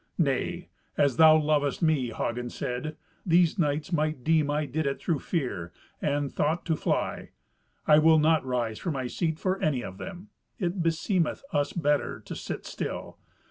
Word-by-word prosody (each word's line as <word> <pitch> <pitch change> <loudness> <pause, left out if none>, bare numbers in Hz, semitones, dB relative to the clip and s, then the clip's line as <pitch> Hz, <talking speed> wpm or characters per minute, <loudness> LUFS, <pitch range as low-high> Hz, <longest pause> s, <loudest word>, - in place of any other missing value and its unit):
"Nay, 140 -7 -1 0.3
as 140 -4 +2
thou 155 -1 +8
lovest 150 -1 +1
me!" 155 -6 +2
Hagen 120 +2 -3
said. 125 +6 -4 0.3
"These 175 +1 +3
knights 150 +1 0
might 155 -4 0
deem 155 -1 +3
I 150 +1 0
did 145 +2 -2
it 140 - -2
through 165 -5 -1
fear, 125 - -3 0.3
and 145 -1 0
thought 160 +4 0
to 165 - +1
fly. - - -2 0.6
I 150 0 +6
will 160 +1 +6
not 155 +1 +3
rise 120 -4 -2
from 170 - -2
my 130 -2 -3
seat 160 +5 -1
for 185 +3 -1
any 140 -5 +1
of 95 +1 -8
them. 190 +2 -8 0.3
It 180 -3 -1
beseemeth 165 - 0
us 145 0 +1
better 150 -4 0
to - - -7
sit - - -6
still. - - -5
155 Hz, 170 wpm, -27 LUFS, 140-165 Hz, 0.6 s, thou